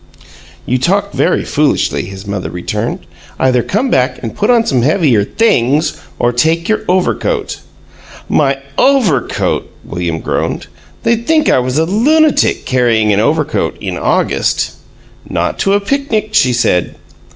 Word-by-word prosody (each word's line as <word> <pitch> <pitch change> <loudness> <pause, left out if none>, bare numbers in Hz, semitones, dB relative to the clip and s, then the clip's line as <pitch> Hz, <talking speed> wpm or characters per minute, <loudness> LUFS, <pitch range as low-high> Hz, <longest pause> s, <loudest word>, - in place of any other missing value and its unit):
"You 130 +1 0
talk 200 +8 0
very - - +1
foolishly," 150 -1 0
his 95 +1 -9
mother 100 -2 -4
returned. 90 0 -3 0.4
"Either 125 -2 +2
come 230 - -1
back 130 0 +1
and 115 - -5
put 210 - 0
on 235 -2 +4
some 130 - +1
heavier 140 - +2
THINGS 155 - +1 0.2
or 120 0 +1
take 160 +7 +1
your 220 - +1
overcoat." 185 0 -1 0.7
"My 140 -2 +2 0.2
overcoat!" 235 - +1 0.2
William 85 -2 -3
groaned. - - -2 0.4
"They'd 235 0 0
think 315 -1 +3
I - - +4
was 125 +2 -2
a 160 - +2
lunatic, 290 - +2
carrying 115 -4 +2
an 100 - +2
overcoat 150 +6 0
in - - -4
August!" - - 0 0.6
"Not - - -2
to 195 - +2
a 200 - +3
picnic," 220 -1 -1
she 135 -12 +3
said. 115 -7 0
150 Hz, 140 wpm, -14 LUFS, -, 0.7 s, on